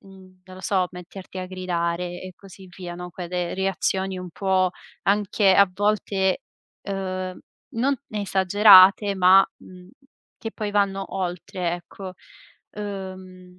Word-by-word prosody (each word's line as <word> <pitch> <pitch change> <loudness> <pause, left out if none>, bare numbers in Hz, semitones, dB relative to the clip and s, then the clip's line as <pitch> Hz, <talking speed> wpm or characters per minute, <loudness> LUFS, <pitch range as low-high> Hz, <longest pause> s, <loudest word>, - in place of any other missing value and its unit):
mhmm, 185 -1 -17
non 185 0 -13
lo - - -10
so, 185 -3 +1
metterti 185 +1 -10
a 185 - -4
gridare 175 -1 -3
e 185 - -8
così 190 -1 -14
via, 180 -2 -7
no, 180 0 -8
quelle 175 0 -4
reazioni 190 0 -1
un 180 -1 -7
po' 190 0 +1 0.3
anche 200 -1 +3
a 200 -1 +6
volte, 200 -1 0 0.4
uhm, 185 -2 -4 0.4
non 265 +5 +1 0.2
esagerate, 200 0 +6
ma, 190 +1 +6
mhmm, 180 0 -14 0.5
che 225 - -6
poi 210 -1 -4
vanno 195 -1 +1
oltre 180 -1 -3
ecco, 185 +2 -9 0.6
uhm, 185 -3 -8
190 Hz, 130 wpm, -24 LUFS, 180-195 Hz, 0.6 s, a